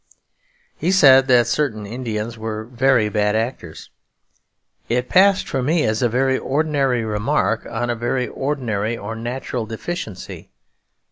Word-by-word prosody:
He 175 - -2
said 135 -8 +6
that 125 -2 +5
certain 115 -5 -1
Indians 115 0 -4
were 110 -1 -5
'very 125 -1 +2
bad 105 0 0
actors.' 110 -8 -4 1.0
It 125 +1 -1
passed 195 +1 +4
for 135 - -2
me 155 +5 +1
as 110 +2 0
a 120 - +2
very 130 +2 +1
ordinary 140 -5 0
remark 110 +2 -1
on 120 +1 -2
a - - -2
very 120 +2 -1
ordinary 120 -6 -2
or 110 +1 -6
natural 120 0 -4
deficiency. 115 - -6
120 Hz, 135 wpm, -20 LUFS, 110-135 Hz, 1.0 s, said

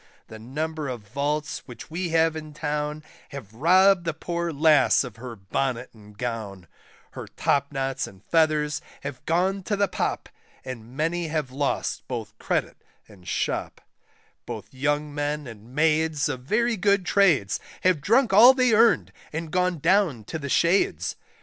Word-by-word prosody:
The 110 - -10
number 150 +6 -4
of 120 -6 -6
vaults 145 +4 -2
which 120 +3 -11
we 175 +2 -2
have 165 0 +2
in 155 -1 -8
Town, 150 0 -3 0.3
Have 120 -7 -9
robbed 185 - +4
the 165 -2 -2
poor 170 +1 -3
lass 150 -2 +4
of 120 -4 -9
her 120 0 -8
bonnet 125 +5 -3
and 105 -2 -17
gown, 110 -6 -5 0.5
Her - - -8
topknots 135 -1 -1
and 95 +1 -15
feathers 155 -2 +2 0.2
have 140 -3 -6
gone 185 +4 +1
to 205 +3 -2
the 200 0 +2
Pop, - - -2 0.4
And 125 0 -8
many 165 +2 0
have 150 -4 -2
lost 140 +2 -2
both 115 -4 -5
credit - - -1 0.3
and 95 -5 -17
shop; - - -2 0.7
Both - - -7
young 145 +2 -1
men 145 0 -2
and 115 +1 -12
maids 155 -1 +2
of 140 -3 -3
very 225 - 0
good 200 0 +2
trades, 170 - +3 0.2
Have 180 -5 +2
drunk 230 - +3
all 240 +6 +9
they 250 -3 +3
earned, 210 - +4 0.2
and 160 0 -5
gone 180 0 +1
down 165 - +2
to 160 - -6
the 140 -1 -5
shades. 170 +9 +2
150 Hz, 155 wpm, -25 LUFS, 130-170 Hz, 0.7 s, all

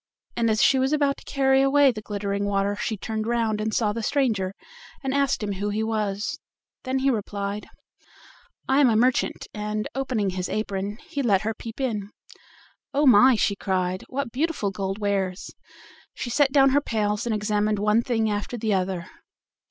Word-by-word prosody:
And 230 -1 +1
as 220 0 +2
she 270 -1 +5
was 265 +3 +1
about 285 -2 +2
to - - -14
carry 270 -1 +3
away 275 0 +5
the 215 -3 -7
glittering 200 -1 -3
water 200 0 0
she 220 +1 -3
turned 220 +2 -4
round 225 -3 0
and 220 +1 -1
saw 215 -1 +1
the 230 - -3
stranger, 215 -7 0 0.5
and 265 0 -1
asked 275 -4 +1
him 205 - -2
who 200 +1 -2
he 215 +2 -1
was. 215 +5 -2 0.5
Then 260 +1 0
he 270 +1 +2
replied: 205 -2 -3 1.0
"I 265 +2 +3
am 275 -4 +6
a 225 - +2
merchant," 250 +3 +1
and 210 0 -3
opening 245 -7 -1
his 180 0 -3
apron, 205 -1 -3
he 285 - -3
let 205 -7 +3
her 220 +1 -1
peep 225 +2 -9
in. 215 -7 -2 0.9
"Oh! 290 +2 +3
my," 255 +1 +7
she 205 -2 +1
cried; 185 -2 -1
"what 270 -2 -3
beautiful 280 -6 -1
gold 195 0 -3
wares!" 195 -3 -2 0.6
she 240 - -4
set 280 +2 +3
down 270 -1 +5
her 285 +2 +3
pails, 210 -3 -1
and 225 - 0
examined 210 0 0
one 210 +2 +3
thing 230 -3 0
after 210 +3 -2
the 220 -2 0
other. 185 -2 -1
215 Hz, 185 wpm, -25 LUFS, 205-260 Hz, 1.0 s, my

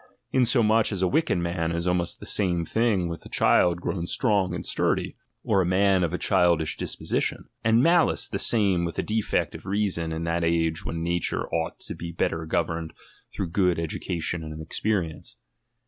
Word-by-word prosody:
Insomuch 115 -4 +3
as 95 -2 -2
a - - +4
wicked 155 - +1
man 85 -1 -1
is 85 +1 -2
almost 90 -1 0
the - - -10
same 90 -4 0
thing 110 -5 +1
with 85 -1 -6
a - - -12
child 85 -1 +3
grown 85 -1 -3
strong 100 -6 +2
and - - -5
sturdy, - - 0 0.3
or 95 - +2
a - - +2
man 95 +1 +3
of 85 - 0
a 90 - -1
childish 85 -4 +2
disposition; - - -2 0.2
and 115 +2 +4
.analice 170 +1 +3
the 100 - -4
same 100 -6 +2
with 85 -2 -4
a - - 0
defect 110 0 -1
of - - -10
reason 95 -5 -1
in 80 +1 -3
that 85 +1 -1
■ge 85 0 0
when 80 -2 -4
nature 85 0 -1
ought 80 -1 -2
to - - -4
be 85 0 -7
better 80 -1 -2
governed 80 0 -2 0.4
through 95 - -4
good 90 0 +2
education 85 0 -3
and 75 0 -7
experience. 85 +1 -3
85 Hz, 180 wpm, -25 LUFS, 85-100 Hz, 0.4 s, a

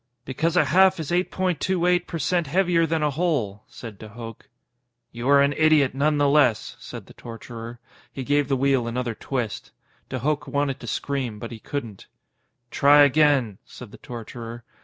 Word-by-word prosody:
_ - - -51
"Because 160 +7 -1
a - - +5
half 190 -1 +4
is 160 0 -5
eight 180 +1 +1
point 185 -5 -1
two 185 -2 0
eight 180 0 +2
per 165 - -4
cent 165 +2 0
heavier 175 0 +2
than 160 -1 -1
a 150 - +1
hole," 135 - -1
said 110 -5 -10
de 110 - -10
Hooch. 115 0 -9
_"You 120 -1 -11
are 140 0 +6
an 140 0 +1
idiot, 155 -4 +3
none 145 +3 +1
the 145 0 +3
less," 140 -6 +2
said - - -9
the - - -16
torturer. 115 0 -9 0.3
He 135 - -6
gave 145 +1 +1
the 135 -1 0
wheel 135 -2 +1
another 120 0 -2
twist. 120 -2 -4 0.4
De 130 - -3
Hooch 150 +3 -1
wanted 140 0 -1
to 120 - -10
scream, 130 -2 -3
but 115 +3 -8
he 115 - -8
couldn't._ 115 -6 -6 0.6
_"Try 145 +1 +6
again," 140 -7 +3
said - - -12
the - - -12
torturer. 115 0 -8
140 Hz, 190 wpm, -24 LUFS, 120-155 Hz, 0.6 s, are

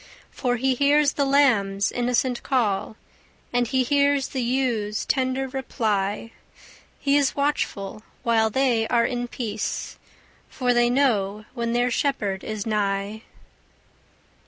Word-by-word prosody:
For 245 -2 -1
he 260 +2 +1
hears 285 +2 +3
the 285 - 0
lambs' 220 -9 +3
innocent 245 0 0
call, 220 -5 0 0.6
And 245 0 +2
he 260 +2 +1
hears 280 0 +2
the 260 - -3
ewes' 235 -4 -1
tender 260 0 0
reply; 220 -5 -2 0.7
He 280 0 +1
is 280 -2 +1
watchful 215 -8 -2 0.2
while 225 -2 +3
they 235 -2 +1
are 235 -1 +2
in 245 -1 -2
peace, 220 -3 -4 0.5
For 250 -2 0
they 240 0 +3
know 215 -6 +1
when 235 -2 -2
their 245 +1 +1
shepherd 210 -8 -1
is 215 -2 -4
nigh. 205 0 -1
245 Hz, 125 wpm, -24 LUFS, 215-265 Hz, 0.7 s, hears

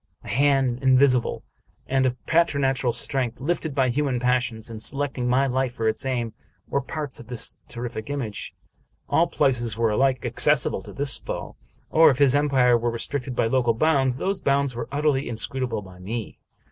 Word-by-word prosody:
A - - -9
hand 135 +1 +2
invisible 130 -2 +3 0.4
and 130 0 +2
of 125 0 -5
preternatural 140 -6 +2
strength, 125 -1 -2
lifted 160 0 -2
by 130 -2 +2
human 135 -1 0
passions, 125 -3 0
and 115 -2 -4
selecting 140 -2 -1
my 130 +2 +3
life 130 -1 -1
for 115 - -1
its 110 +4 0
aim, 120 -4 -2 0.3
were 140 - 0
parts 145 0 -4
of 120 - -12
this 125 -2 -1
terrific 120 -1 -6
image. 130 -7 -5 0.5
All - - +3
places 120 -5 0
were 115 -1 +2
alike 130 +3 +1
accessible - - +1
to - - -11
this 140 -1 -2
foe; - - -6 0.4
or, 160 0 +7
if 130 - +1
his 140 -2 +5
empire 135 -4 +3
were 120 +1 0
restricted 125 +2 -4
by - - +2
local 120 -1 +2
bounds, 135 -2 +2
those 195 +5 -1
bounds 140 -1 +1
were 115 -1 -5
utterly 145 -2 0
inscrutable 120 -1 -2
by 90 -1 -14
me. 110 +4 -6
130 Hz, 170 wpm, -24 LUFS, 120-140 Hz, 0.5 s, or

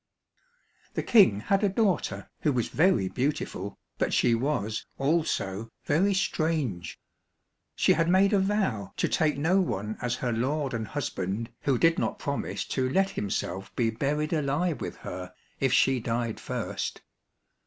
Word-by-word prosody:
The - - -1
King 185 - +5
had 195 - +1
a 205 - +4
daughter 185 - 0
who 150 - +2
was 125 -4 0
very 155 - +3
beautiful, 125 -4 -2 0.2
but - - +1
she 120 - +4
was 115 -4 -1
also 135 - 0 0.2
very 190 +7 +3
strange. 155 - -1 0.8
She - - +4
had 165 +1 +1
made 195 +3 +4
a 200 - +5
vow 190 - 0
to - - +1
take 155 -4 +1
no 170 +7 +3
one 105 - -3
as 120 0 0
her 125 -1 -2
lord 135 +4 -1
and 110 -2 -3
husband 115 -5 -3
who 135 -3 +3
did 165 +5 +3
not - - -1
promise 140 -1 -3
to 130 -1 0
let 195 +8 +2
himself 100 - -3
be 115 -2 +1
buried 150 +7 -1
alive 150 +1 0
with - - -4
her 90 0 -7 0.2
if 135 -2 +2
she 130 +1 +4
died 115 -1 -2
first. - - -4
135 Hz, 155 wpm, -28 LUFS, 110-165 Hz, 0.8 s, King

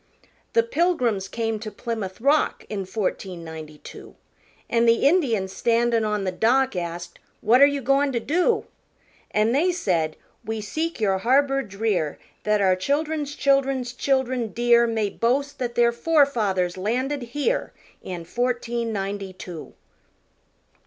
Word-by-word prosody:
The 465 - +4
Pilgrims 325 - 0
came 225 +1 -2
to 215 0 -6
Plymouth 215 -4 -5
Rock 285 +5 +1
In 200 -3 -3
fourteen 185 -3 -3
ninety 160 -2 -9
two, - - -12 0.5
An' 235 0 +2
the 230 +3 +4
Indians 230 - +1
standin' 235 -1 +2
on 210 -2 -1
the 185 - -1
dock 255 +7 +2
Asked, 175 0 -5 0.2
"What 240 +5 +4
are 280 - +9
you 285 -1 -2
goin' 275 +2 +2
to 235 - +1
do?" 360 - +1 0.6
An' 215 +2 +2
they 315 +8 +3
said, 170 - 0 0.3
"We 220 0 -3
seek 315 +10 -3
your 195 -3 +1
harbor 275 +5 +3
drear 195 - -2 0.3
That 210 -1 +2
our 190 -2 +4
children's 290 +7 -1
children's 275 -3 +1
children 255 -3 0
dear 235 0 +4
May 220 -3 -1
boast 275 +5 0
that 240 -2 -3
their 235 0 +4
forefathers 235 - +1
landed 255 +8 -1 0.2
here 480 +12 0 0.3
In 175 -2 -6
fourteen 240 +1 -2
ninety 195 -1 -4
two." 175 -3 -9
235 Hz, 140 wpm, -24 LUFS, 195-275 Hz, 0.6 s, are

